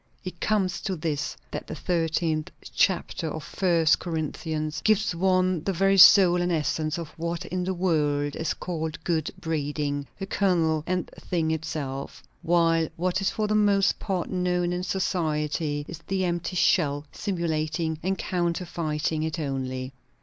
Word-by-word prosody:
It 180 Hz, -2 st, -7 dB
comes 195 Hz, -4 st, +1 dB
to 190 Hz, -, -2 dB
this; 155 Hz, -3 st, -3 dB
that -, -, -5 dB
the -, -, -5 dB
thirteenth 165 Hz, -2 st, 0 dB, 0.2 s
chapter 180 Hz, -3 st, +1 dB
of 155 Hz, 0 st, -5 dB
First 165 Hz, -1 st, +2 dB
Corinthians 155 Hz, -1 st, -3 dB
gives 215 Hz, -2 st, +3 dB
one 185 Hz, -1 st, +2 dB
the 195 Hz, -, 0 dB
very 195 Hz, +2 st, +3 dB
soul 180 Hz, -2 st, +8 dB
and 175 Hz, 0 st, 0 dB
essence 155 Hz, -1 st, 0 dB
of 165 Hz, -3 st, -5 dB
what 170 Hz, 0 st, -3 dB
in 180 Hz, 0 st, -2 dB
the 190 Hz, -, 0 dB
world 150 Hz, -5 st, +1 dB
is 160 Hz, -, -2 dB
called 160 Hz, -3 st, -4 dB
good 160 Hz, -3 st, 0 dB
breeding; 145 Hz, -3 st, -2 dB
the 195 Hz, -, -4 dB
kernel 170 Hz, -6 st, +1 dB
and 180 Hz, -1 st, 0 dB
thing 165 Hz, -3 st, -1 dB
itself; 150 Hz, -5 st, -4 dB, 0.2 s
while 165 Hz, -1 st, +3 dB
what 180 Hz, +3 st, 0 dB
is 195 Hz, -, +2 dB
for 215 Hz, +2 st, -1 dB
the 210 Hz, -, 0 dB
most 205 Hz, -2 st, +3 dB
part 190 Hz, -4 st, -2 dB
known 180 Hz, -1 st, 0 dB
in 180 Hz, -, -2 dB
society 155 Hz, -5 st, -1 dB
is 170 Hz, -, -7 dB
the 190 Hz, -1 st, 0 dB
empty 175 Hz, +1 st, -2 dB
shell, 145 Hz, -5 st, +2 dB
simulating 160 Hz, -4 st, -2 dB
and 190 Hz, +1 st, -1 dB
counterfeiting 170 Hz, -4 st, -1 dB
it 160 Hz, -1 st, -2 dB
only. 130 Hz, -3 st, -3 dB
165 Hz, 150 wpm, -26 LUFS, 155-185 Hz, 0.2 s, soul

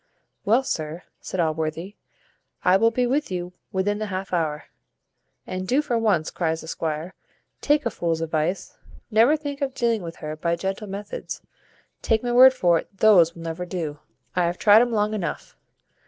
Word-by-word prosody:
"Well, 230 Hz, +6 st, +4 dB
sir," 160 Hz, -7 st, -4 dB, 0.2 s
said 185 Hz, -, -6 dB
Allworthy, 160 Hz, +4 st, -2 dB, 0.7 s
"I 180 Hz, 0 st, +6 dB
will 225 Hz, +4 st, +4 dB
be 245 Hz, +2 st, 0 dB
with 280 Hz, +5 st, 0 dB
you 180 Hz, -1 st, -4 dB, 0.2 s
within 205 Hz, +2 st, 0 dB
the 215 Hz, -, -3 dB
half 190 Hz, -1 st, -5 dB
hour." 155 Hz, -4 st, -1 dB, 0.8 s
"And 185 Hz, 0 st, -5 dB
do 275 Hz, +7 st, +2 dB
for 250 Hz, -5 st, -1 dB
once," 210 Hz, -9 st, +1 dB
cries 160 Hz, -2 st, -1 dB
the -, -, -11 dB
squire, 160 Hz, +2 st, -3 dB, 0.5 s
"take 295 Hz, -1 st, +2 dB
a 235 Hz, -, 0 dB
fool's 165 Hz, -3 st, -1 dB
advice; 165 Hz, +3 st, -2 dB, 0.3 s
never 235 Hz, +8 st, +5 dB
think 285 Hz, -1 st, -6 dB
of 265 Hz, -2 st, -2 dB
dealing 235 Hz, -4 st, +1 dB
with 170 Hz, -1 st, -7 dB
her 155 Hz, 0 st, -6 dB
by 170 Hz, +2 st, -1 dB
gentle 195 Hz, +4 st, -4 dB
methods, 205 Hz, -, -6 dB, 0.6 s
take 220 Hz, 0 st, +1 dB
my 245 Hz, -, -1 dB
word 260 Hz, +2 st, +8 dB
for 175 Hz, -7 st, +3 dB
it 195 Hz, -, -12 dB
those 180 Hz, -6 st, +5 dB
will 165 Hz, -, -9 dB
never 165 Hz, +2 st, -4 dB
do. 165 Hz, -5 st, -4 dB, 0.4 s
I 180 Hz, -1 st, +2 dB
have 175 Hz, +1 st, -1 dB
tried 210 Hz, +1 st, +6 dB
'um 240 Hz, 0 st, +1 dB
long 210 Hz, -1 st, +1 dB
enough. 180 Hz, -7 st, -4 dB
190 Hz, 180 wpm, -24 LUFS, 165-225 Hz, 0.8 s, word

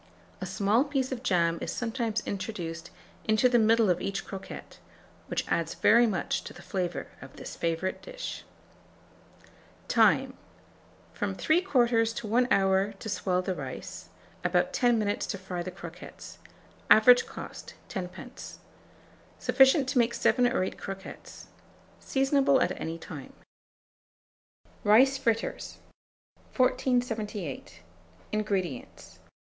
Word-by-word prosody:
A -, -, -3 dB
small 210 Hz, +5 st, +2 dB
piece 275 Hz, -3 st, -1 dB
of 250 Hz, -2 st, -4 dB
jam 170 Hz, -8 st, +1 dB
is -, -, -3 dB
sometimes 230 Hz, -2 st, -2 dB
introduced 175 Hz, -4 st, -5 dB, 0.4 s
into 220 Hz, +3 st, +4 dB
the 245 Hz, -1 st, +4 dB
middle 225 Hz, 0 st, +4 dB
of 180 Hz, -1 st, +1 dB
each 195 Hz, 0 st, -3 dB
croquette, 195 Hz, -1 st, -9 dB, 0.5 s
which -, -, -2 dB
adds 165 Hz, -1 st, -1 dB
very 235 Hz, +2 st, +5 dB
much 190 Hz, -5 st, -1 dB
to -, -, -8 dB
the -, -, -13 dB
flavour 180 Hz, -5 st, -3 dB, 0.2 s
of -, -, -12 dB
this -, -, -8 dB
favourite 170 Hz, +3 st, -2 dB
dish. -, -, -7 dB, 1.4 s
Time. -, -, +4 dB, 0.8 s
From -, -, -2 dB
3/4 245 Hz, -10 st, +2 dB
to -, -, -5 dB
1 245 Hz, +4 st, +3 dB
hour 195 Hz, 0 st, +3 dB
to 205 Hz, +2 st, -8 dB
swell 185 Hz, -2 st, 0 dB
the 185 Hz, -, -1 dB
rice; -, -, -7 dB, 0.3 s
about -, -, +1 dB
10 240 Hz, -2 st, +3 dB
minutes 205 Hz, -2 st, -1 dB
to 200 Hz, -, -3 dB
fry 185 Hz, -2 st, -5 dB
the 180 Hz, -, -4 dB
croquettes. 175 Hz, -1 st, -10 dB, 0.5 s
Average 245 Hz, +3 st, +7 dB
cost, -, -, -9 dB
10d. 190 Hz, +7 st, -7 dB, 0.8 s
Sufficient 270 Hz, +1 st, +4 dB
to 260 Hz, -1 st, +2 dB
make 235 Hz, 0 st, +2 dB
7 250 Hz, -1 st, +3 dB
or 245 Hz, -6 st, +1 dB
8 185 Hz, -, -5 dB
croquettes. 195 Hz, 0 st, -8 dB, 0.5 s
Seasonable 270 Hz, 0 st, +2 dB
at 180 Hz, -, +2 dB
any 165 Hz, +1 st, -3 dB
time. 155 Hz, -4 st, -9 dB, 1.5 s
RICE 260 Hz, +6 st, +5 dB
FRITTERS. 230 Hz, -4 st, -1 dB, 0.8 s
1478. 215 Hz, -, -1 dB, 0.5 s
INGREDIENTS. 195 Hz, -, -3 dB
215 Hz, 120 wpm, -28 LUFS, 185-245 Hz, 1.5 s, Average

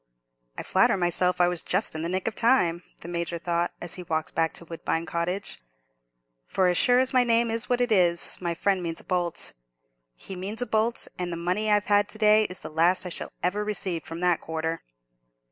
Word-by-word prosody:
"I -, -, -4 dB
flatter -, -, +3 dB
myself 180 Hz, 0 st, +1 dB
I 175 Hz, -, +5 dB
was 175 Hz, -1 st, -2 dB
just 190 Hz, +4 st, -1 dB
in 155 Hz, -, -3 dB
the 165 Hz, -, -2 dB
nick 185 Hz, +3 st, -2 dB
of 225 Hz, -, -1 dB
time," 215 Hz, -9 st, +2 dB, 0.2 s
the -, -, -9 dB
Major 170 Hz, 0 st, -3 dB
thought, 170 Hz, 0 st, -1 dB
as 175 Hz, -, -5 dB
he 180 Hz, -, -5 dB
walked 160 Hz, -2 st, -3 dB
back 165 Hz, -1 st, +1 dB
to 170 Hz, -, -9 dB
Woodbine 165 Hz, 0 st, -3 dB
Cottage, 170 Hz, -, -3 dB, 0.9 s
"for 185 Hz, -, +1 dB
as 175 Hz, -, +1 dB
sure 245 Hz, -1 st, +5 dB
as 260 Hz, +1 st, +2 dB
my 255 Hz, -1 st, +5 dB
name's 230 Hz, 0 st, +2 dB
what 245 Hz, 0 st, +1 dB
it 245 Hz, -1 st, 0 dB
is, 175 Hz, -4 st, +2 dB
my 170 Hz, -1 st, -2 dB
friend 195 Hz, +1 st, 0 dB
means 165 Hz, -1 st, -4 dB
a -, -, -12 dB
bolt. 175 Hz, -2 st, +1 dB, 0.6 s
He 190 Hz, -, -7 dB
means 195 Hz, +5 st, -5 dB
a 245 Hz, -, 0 dB
bolt; 220 Hz, +1 st, 0 dB
and 180 Hz, -1 st, -2 dB
the 170 Hz, -, -3 dB
money 180 Hz, +6 st, -1 dB
I've 210 Hz, -1 st, +3 dB
had 205 Hz, 0 st, +3 dB
to -, -, 0 dB
day 215 Hz, 0 st, +5 dB
is 180 Hz, -2 st, -4 dB
the -, -, -7 dB
last 175 Hz, +4 st, +3 dB
I -, -, -4 dB
shall -, -, -5 dB
ever 195 Hz, +4 st, 0 dB
receive 190 Hz, -5 st, -2 dB
from 165 Hz, +1 st, -7 dB
that 180 Hz, -2 st, +2 dB
quarter." 160 Hz, +1 st, -3 dB
180 Hz, 215 wpm, -26 LUFS, 170-210 Hz, 0.9 s, I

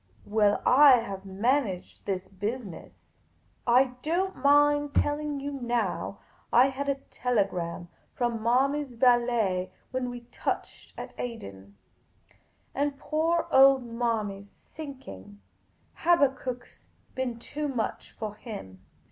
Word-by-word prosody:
" 105 Hz, -, -30 dB
Well, 210 Hz, -1 st, +2 dB
I 275 Hz, +1 st, +8 dB
have 200 Hz, -5 st, -1 dB
managed 205 Hz, -1 st, -1 dB
this 190 Hz, -2 st, -2 dB
business. 205 Hz, 0 st, -6 dB, 0.7 s
I 250 Hz, +2 st, +4 dB
don't 370 Hz, +6 st, 0 dB
mind 290 Hz, +1 st, +4 dB
tell 290 Hz, 0 st, +2 dB
ing 300 Hz, -2 st, -3 dB
you 285 Hz, +1 st, -4 dB
now, 240 Hz, -3 st, -2 dB, 0.3 s
I 250 Hz, +3 st, +6 dB
had 280 Hz, +1 st, -3 dB
a 280 Hz, -, +2 dB, 0.2 s
telegram 190 Hz, -8 st, -1 dB, 0.3 s
from 240 Hz, -2 st, -1 dB
Manny's 265 Hz, +4 st, +1 dB
valet 235 Hz, -6 st, +2 dB, 0.2 s
when 255 Hz, -1 st, -2 dB
we 245 Hz, 0 st, -7 dB
touched -, -, -4 dB
at -, -, -7 dB
Aden; 100 Hz, -, -7 dB, 1.0 s
and 285 Hz, 0 st, -1 dB
poor 325 Hz, +3 st, 0 dB
old 270 Hz, -1 st, +7 dB
Manny 230 Hz, -4 st, -2 dB
's 200 Hz, -, -17 dB, 0.2 s
sinking, 100 Hz, -, -10 dB, 0.6 s
Habak 300 Hz, -6 st, +4 dB
kuk 255 Hz, -1 st, -5 dB
's -, -, -26 dB, 0.2 s
been 255 Hz, -3 st, -3 dB
too 295 Hz, +5 st, -4 dB
much 250 Hz, -5 st, -3 dB
for 215 Hz, -2 st, -5 dB
him. 200 Hz, -, -9 dB
245 Hz, 125 wpm, -28 LUFS, 205-280 Hz, 1.0 s, I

